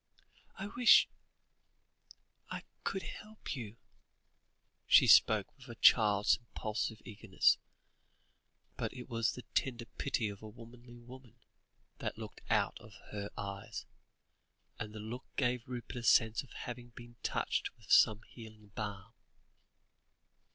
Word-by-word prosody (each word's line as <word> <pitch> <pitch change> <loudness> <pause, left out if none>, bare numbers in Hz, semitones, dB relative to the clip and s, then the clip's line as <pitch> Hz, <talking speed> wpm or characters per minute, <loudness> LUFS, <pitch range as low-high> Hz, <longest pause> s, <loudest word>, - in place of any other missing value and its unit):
"I 195 - -5
wish 240 +4 +6 1.4
I - - -5 0.2
could 190 - -2
help 215 -6 -7
you," 115 -3 -7 1.1
she - - +7
spoke 105 -3 +5
with 130 -1 -15
a 115 - -7
child's 105 -3 +5
impulsive 110 -2 -4
eagerness, 105 -3 +2 1.2
but - - -2
it 125 - -8
was 115 -2 0
the 125 - -9
tender 120 -3 -1
pity 125 -3 -2
of 100 -1 -7
a 110 - -8
womanly 120 +2 -13
woman, 125 -1 -13 0.6
that - - -4
looked - - -9
out - - +1
of - - -14 0.2
her 100 -1 -4
eyes, 100 -1 -6 0.9
and 105 0 -5
the 110 - -8
look 115 +4 -7
gave 125 -2 0
Rupert 125 0 -6
a - - -3
sense 115 -1 +4
of 135 - -15
having 120 0 -7
been 120 0 -12
touched - - -1
with - - -12
some 110 0 +6
healing 110 -3 -13
balm. 100 -1 -6
115 Hz, 130 wpm, -34 LUFS, 105-125 Hz, 1.4 s, she